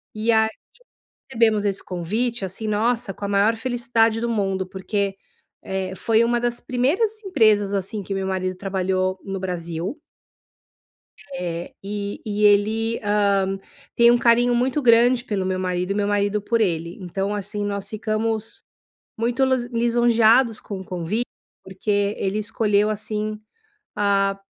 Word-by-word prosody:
E 220 +2 +1
aí, 220 -1 +4 0.8
recebemos 220 -4 +2
esse 200 -1 -1
convite, 210 +6 -2
assim, 190 +4 -5
nossa, 215 -1 0
com 205 - -8
a - - -2
maior 205 +3 +3
felicidade 230 -1 +1
do 235 - -1
mundo, 195 -4 -1
porque, 195 +1 -2 0.5
eh, 190 -1 -3
foi 225 +4 +2
um 235 - +1
das 240 0 -1
primeiras 330 - 0
empresas, 215 - +3
assim, 200 +2 -2
que 195 - -6
meu 195 0 -2
marido 185 -1 -2
trabalhou 185 -1 -1
no 195 0 -4
Brasil. 175 - -4 1.4
Eh, 170 -4 -4
e 205 0 -4
e 210 -1 -1
ele, 220 +3 +3
hã, 200 -2 +2 0.4
tem 235 0 +6
um 240 - +4
carinho 240 +1 +4
muito 255 +4 +1
grande 240 0 +5
pelo 205 -6 -2
meu 185 0 -1
marido 180 0 -1
e - - +2
meu 205 -1 0
marido 205 0 +1
por 230 +2 0
ele, 170 -4 -1
então, 195 +3 -2
assim, 205 +1 -3
nós 200 -1 -3
ficamos 220 +1 -2 0.5
muito 235 +3 +1
lus 260 -2 +1
lisonjeados 235 0 +3
com 195 -3 -6
o - - -8
convite, 185 +7 -2 0.4
porque 200 +2 -1
ele 195 +2 -1
escolheu, 210 -1 +1
assim, 215 0 -3 0.6
hã, 195 -1 +2
210 Hz, 145 wpm, -23 LUFS, 195-230 Hz, 1.4 s, tem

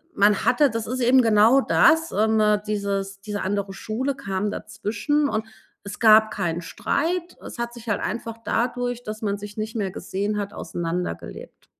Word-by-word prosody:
man 205 0 +3
hatte 280 +3 +4
das 225 -1 -3
ist 255 +2 -3
eben 255 +2 +5
genau 225 +3 +5
das, 320 +4 +4
ähm, 220 +1 +2 0.3
dieses 200 -1 -2
diese 205 0 -4
andere 200 0 -2
Schule 250 +7 -3
kam 205 -4 -2
dazwischen. 225 +9 -1
Und 215 -2 -2 0.4
es 200 +1 -8
gab 220 -1 +6
keinen 175 -3 -2
Streit 340 - -2
es - - -9
hat 235 0 -3
sich 235 -1 -9
halt 205 - +1
einfach 230 +1 -4
dadurch, 245 +1 -1
dass 215 -1 -6
man 200 -1 0
sich 205 +1 -10
nicht 215 +2 -4
mehr 200 -4 -1
gesehen 205 +3 -3
hat, 200 0 -4
auseinandergelebt. 170 - -5
215 Hz, 170 wpm, -24 LUFS, 200-240 Hz, 0.4 s, gab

